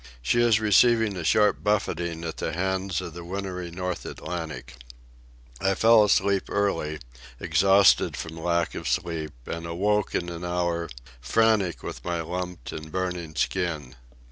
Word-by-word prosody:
She 120 - +2
is 115 -3 +4
receiving 110 0 +4
a 90 - -4
sharp 105 +4 +3
buffeting 85 -5 -1
at 80 -1 -5
the - - -3
hands 95 0 -1
of 85 -3 -7
the 85 +1 -8
wintry 90 -1 -5
North 90 +1 -4
Atlantic. 80 -7 -6 0.8
I 95 0 +2
fell 115 +1 +6
asleep 100 -1 +2
early, 85 -7 0 0.4
exhausted 95 +5 +4
from 80 -1 -6
lack 85 0 0
of - - -5
sleep, 85 -3 -2
and 85 0 -5
awoke 105 +5 0
in 85 - -1
an 85 0 -7
hour, 85 -1 -1 0.3
frantic 100 - +2
with - - -7
my 85 -1 -2
lumped 90 -2 -5
and 80 0 -8
burning 90 -3 -3
skin. 80 -8 -2
90 Hz, 145 wpm, -26 LUFS, 85-100 Hz, 0.8 s, fell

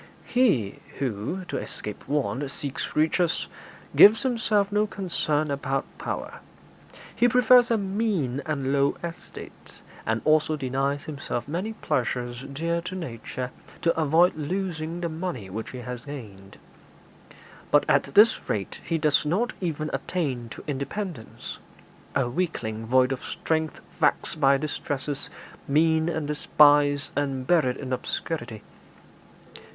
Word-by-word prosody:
'He 195 - +2 0.2
who, 135 - -3
to - - -3
escape 105 - -5
want, 140 -1 -1
seeks 140 0 -5
riches, 160 +3 +2 0.5
gives 220 +5 +8
himself 220 -5 +1
no 210 +1 +2
concern 155 -7 -1
about 135 0 -1
power; - - -4 0.8
he 245 - +4
prefers 250 0 +6
a 230 - +3
mean 190 - -1
and 140 -3 -1
low 140 0 +2
estate, 170 0 -9 0.2
and 115 +1 -1
also 155 0 +3
denies 135 +1 -1
himself 140 -5 -4
many 180 +9 -3
pleasures 120 - -2
dear 165 +4 -1
to 180 +2 -6
nature 125 -5 -5 0.3
to 165 0 +3
avoid 165 +3 +4
losing 165 +1 -3
the 170 - 0
money 160 - -5
which 110 +3 -5
he 130 - -8
has 125 -1 -6
gained. 105 -9 -9 1.1
But - - +4
at - - +2
this 215 +3 +5
rate 100 -2 -2
he 165 - 0
does 150 -2 +3
not 195 +11 0
even 155 -3 -2
attain 130 -10 -2
to - - -9
independence 145 - -5 0.6
a 135 -3 +2
weakling 120 -7 -2
void 130 +2 +4
of 135 - -3
strength, 160 -1 -2 0.2
vexed 160 - +1
by 140 0 +6
distresses, 145 -1 -3 0.4
mean 160 +3 +3
and 160 -3 -2
despised, 145 -1 +4
and 135 -3 -1
buried 135 -6 +3
in 130 -2 -4
obscurity. 120 -4 -4
150 Hz, 130 wpm, -26 LUFS, 130-175 Hz, 1.1 s, gives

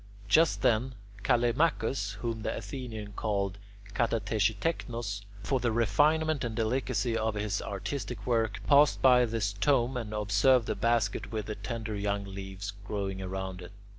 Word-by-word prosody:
Just 160 +10 +4
then 125 +3 +2 0.3
Callimachus, 120 -3 +1
whom 115 -2 -2
the - - -2
Athenians 110 -1 -6
called 100 -2 -1 0.3
[Greek: 105 - -15
katatexitechnos] 115 0 -1 0.2
for 135 -2 +1
the 120 -1 0
refinement 150 +7 +2
and 115 -2 -3
delicacy 115 0 0
of 110 -1 0
his 105 -1 -1
artistic 120 +5 -4
work, 115 -4 0
passed 145 0 +5
by 125 -1 +7
this 110 -3 -1
tomb 125 +3 +2
and 115 -3 -4
observed 105 +4 +3
the - - -1
basket 115 -4 0
with 110 -2 -3
the 105 - -3
tender 110 -2 -5
young 100 0 -1
leaves 95 +1 -6
growing 100 -2 -3
round 95 0 -4
it. 90 +2 -10
110 Hz, 145 wpm, -30 LUFS, 100-125 Hz, 0.3 s, by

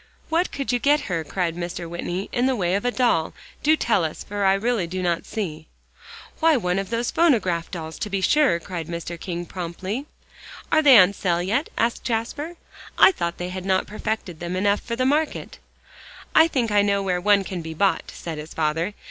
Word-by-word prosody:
"What 335 +3 +1
could 275 -2 -2
you 245 - +1
get 290 +4 +3
her," 170 -3 -2
cried 165 +2 -2
Mr. 175 0 -5
Whitney, 175 +3 -4
"in 245 +1 +1
the 265 - +1
way 180 -5 0
of 200 +4 -1
a - - +3
doll? 240 -11 +1 0.3
Do 310 +1 +4
tell 225 - +2
us, 155 -1 -4
for 205 0 -2
I 190 0 +5
really 215 -3 0
do 185 +2 -4
not 170 -1 -1
see." 160 -7 -5 0.7
"Why, 320 -3 +4
one 180 -4 0
of 195 - -4
those 230 +1 -1
phonograph 195 - +2
dolls, 160 -3 -7
to 210 - -3
be 195 -1 -1
sure," 275 - +3
cried 170 -2 -6
Mr. 170 0 -5
King 175 -1 -4
promptly. 185 - -5 0.6
"Are 315 - +5
they 275 -5 +8
on 190 0 +6
sale 175 -3 0
yet?" 225 - 0
asked 230 +1 0
Jasper. 255 +8 -3 0.4
"I - - +8
thought 170 - -3
they 180 0 -4
had 185 0 -5
not 190 0 +1
perfected 210 -5 -4
them 175 +1 -4
enough 200 +2 +1
for 235 - -4
the 255 +2 0
market." 300 +3 -1 0.7
"I 320 - +7
think 245 -8 -1
I 205 0 +5
know 200 -1 +1
where 180 -2 0
one 205 0 +4
can 185 -2 -5
be 160 0 -7
bought," 195 +4 +1
said 160 -3 -6
his 155 +2 -9
father. 165 +5 -1
195 Hz, 205 wpm, -23 LUFS, 175-240 Hz, 0.7 s, they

